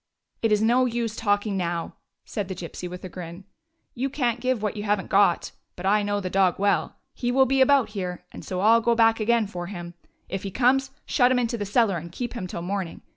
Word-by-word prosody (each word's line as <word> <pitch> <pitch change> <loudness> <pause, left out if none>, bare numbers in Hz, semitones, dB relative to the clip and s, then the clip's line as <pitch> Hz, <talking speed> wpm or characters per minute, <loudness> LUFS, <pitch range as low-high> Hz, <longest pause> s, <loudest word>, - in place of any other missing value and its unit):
" - - -51
It 225 - +1
is 210 0 +3
no 245 +3 +4
use 230 -2 -2
talking 205 -1 0
now," 170 -2 -2 0.3
said 205 -3 -4
the 190 - -5
Gypsy 180 0 -7
with 180 0 -8
a - - -5
grin. 175 0 -8 0.3
" 330 0 -49
You 270 - +1
can't 245 -4 -1
give 255 -3 -1
what 210 0 -1
you 210 - -4
have 205 0 +1
n't - - -9
got. 195 -3 +3 0.2
But 180 - -7
I 210 +2 +4
know 205 0 -1
the 190 - -4
dog 185 -1 +2
well. 200 +1 +1 0.2
He 245 -1 -2
will 265 +1 +5
be 265 +1 +2
about 270 -2 +4
here, 185 -4 -5
and - - -10
so 185 -1 -3
I 220 +3 +6
'll 230 - +3
be 235 +1 +2
back 225 0 +4
again 230 +1 +2
for 175 -3 -6
him. 175 -3 -7 0.3
If 190 0 -4
he 200 - -4
comes, 265 +5 +2 0.2
shut 250 -2 +3
him 255 - +3
into 240 -1 0
the 205 -3 -4
cellar 205 -3 +2
and 170 +1 -8
keep 240 +6 -5
him 200 -7 -5
till 170 - -6
the 175 - -6
morning. 190 -3 -3
205 Hz, 255 wpm, -25 LUFS, 185-235 Hz, 0.3 s, I